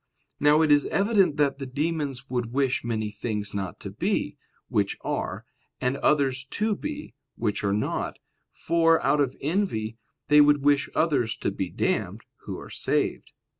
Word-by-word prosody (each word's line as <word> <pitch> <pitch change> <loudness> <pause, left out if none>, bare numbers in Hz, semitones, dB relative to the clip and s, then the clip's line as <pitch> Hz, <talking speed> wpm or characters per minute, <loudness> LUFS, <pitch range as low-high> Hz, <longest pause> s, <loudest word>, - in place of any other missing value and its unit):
Now 150 +2 +5
it 155 - +3
is 145 -1 +5
evident 195 -6 +2
that 145 -1 +1
the 135 - -5
demons 140 -2 -2
would 120 -3 -2
wish 135 0 +1
many 110 -2 -2
things 105 -1 -3
not 95 -5 -4
to - - -6
be, - - -1 0.3
which 100 -1 0
are, - - -3 0.3
and 125 +1 0
others 135 -3 +2
to 210 +10 -1
be, 300 +4 -6 0.2
which 105 -3 -2
are 100 - +1
not: 105 +1 -1 0.3
for, 165 0 +3
out 145 +2 +3
of 135 -2 -1
envy, 135 - -1 0.3
they 150 +1 +7
would 145 -1 +4
wish 145 -1 +3
others 135 -9 +1
to - - -1
be - - -3
damned, - - -1 0.2
who - - -5
are - - -10
saved. - - -1
140 Hz, 165 wpm, -26 LUFS, 120-155 Hz, 0.3 s, they